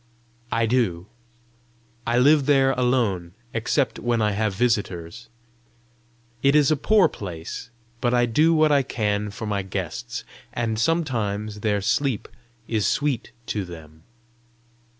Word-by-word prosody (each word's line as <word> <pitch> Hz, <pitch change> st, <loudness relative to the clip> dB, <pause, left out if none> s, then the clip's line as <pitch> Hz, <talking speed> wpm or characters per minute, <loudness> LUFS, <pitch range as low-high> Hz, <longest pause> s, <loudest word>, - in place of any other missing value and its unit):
"I 115 Hz, 0 st, +2 dB
do. 110 Hz, -8 st, 0 dB, 1.0 s
I 120 Hz, +1 st, +2 dB
live 140 Hz, +2 st, +5 dB
there 135 Hz, -2 st, +4 dB
alone, 115 Hz, -9 st, 0 dB, 0.2 s
except 120 Hz, +5 st, 0 dB
when 120 Hz, -1 st, 0 dB
I 105 Hz, -1 st, +2 dB
have 105 Hz, -1 st, -1 dB
visitors. 105 Hz, -3 st, -1 dB, 1.1 s
It 140 Hz, +1 st, +4 dB
is 150 Hz, -1 st, +5 dB
a -, -, +4 dB
poor 210 Hz, +7 st, +4 dB
place, 85 Hz, +3 st, -7 dB, 0.3 s
but 120 Hz, -, +1 dB
I 120 Hz, 0 st, +3 dB
do 150 Hz, +8 st, +3 dB
what 155 Hz, -2 st, +4 dB
I 140 Hz, -1 st, +5 dB
can 105 Hz, -5 st, -1 dB
for 110 Hz, +2 st, -7 dB
my 100 Hz, -2 st, -1 dB
guests, 95 Hz, -1 st, -5 dB, 0.3 s
and 115 Hz, -2 st, -1 dB
sometimes 110 Hz, -9 st, -1 dB
their 105 Hz, -1 st, 0 dB
sleep 115 Hz, +2 st, 0 dB, 0.4 s
is 110 Hz, -3 st, 0 dB
sweet 145 Hz, -5 st, 0 dB, 0.2 s
to 105 Hz, -4 st, -2 dB
them." 80 Hz, -3 st, -11 dB
115 Hz, 130 wpm, -24 LUFS, 100-135 Hz, 1.1 s, live